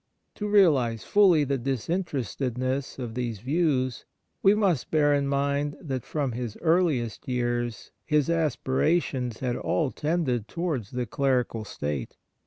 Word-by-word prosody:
To 210 Hz, -, -4 dB
realize 145 Hz, -, +4 dB
fully 185 Hz, -7 st, +5 dB
the 140 Hz, -1 st, -1 dB
disinterestedness 130 Hz, -, -2 dB
of 120 Hz, -4 st, -5 dB
these 120 Hz, -2 st, -3 dB
views, 130 Hz, -, 0 dB, 0.4 s
we 195 Hz, +1 st, +5 dB
must 190 Hz, -, +1 dB
bear 145 Hz, -2 st, +3 dB
in 140 Hz, -1 st, +1 dB
mind 140 Hz, +1 st, 0 dB
that 130 Hz, -7 st, -4 dB
from 145 Hz, -4 st, -1 dB
his 120 Hz, -2 st, -5 dB
earliest 160 Hz, -, +1 dB
years 120 Hz, -2 st, -2 dB
his 150 Hz, -3 st, +2 dB
aspirations 145 Hz, -5 st, 0 dB
had 125 Hz, -2 st, -1 dB
all 145 Hz, +1 st, 0 dB
tended 145 Hz, -8 st, -1 dB
towards 155 Hz, -, -3 dB
the 125 Hz, -1 st, -3 dB
clerical 125 Hz, -3 st, 0 dB
state. 75 Hz, -, -4 dB
135 Hz, 130 wpm, -27 LUFS, 120-160 Hz, 0.4 s, fully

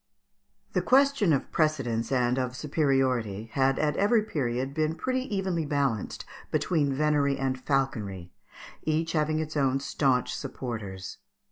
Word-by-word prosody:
The -, -, +2 dB
question 270 Hz, -8 st, +4 dB
of 140 Hz, -, 0 dB
precedence 135 Hz, -8 st, 0 dB
and 125 Hz, -1 st, +2 dB
of 125 Hz, -1 st, -2 dB
superiority 130 Hz, -8 st, 0 dB
had, 135 Hz, -1 st, +2 dB
at 150 Hz, -1 st, +1 dB
every 215 Hz, +2 st, +3 dB
period, 135 Hz, -, -2 dB
been 155 Hz, +1 st, 0 dB
pretty 255 Hz, +6 st, -1 dB
evenly 185 Hz, -4 st, 0 dB
balanced 140 Hz, -8 st, -1 dB, 0.2 s
between 150 Hz, -1 st, +1 dB
venery 145 Hz, 0 st, +2 dB
and 130 Hz, -1 st, -2 dB
falconry, 110 Hz, -, -1 dB, 0.5 s
each 160 Hz, +1 st, 0 dB
having 155 Hz, -1 st, +1 dB
its 155 Hz, 0 st, -3 dB
own 135 Hz, -2 st, +2 dB
staunch 135 Hz, -2 st, +1 dB
supporters. 110 Hz, -8 st, -6 dB
140 Hz, 130 wpm, -28 LUFS, 125-155 Hz, 0.5 s, question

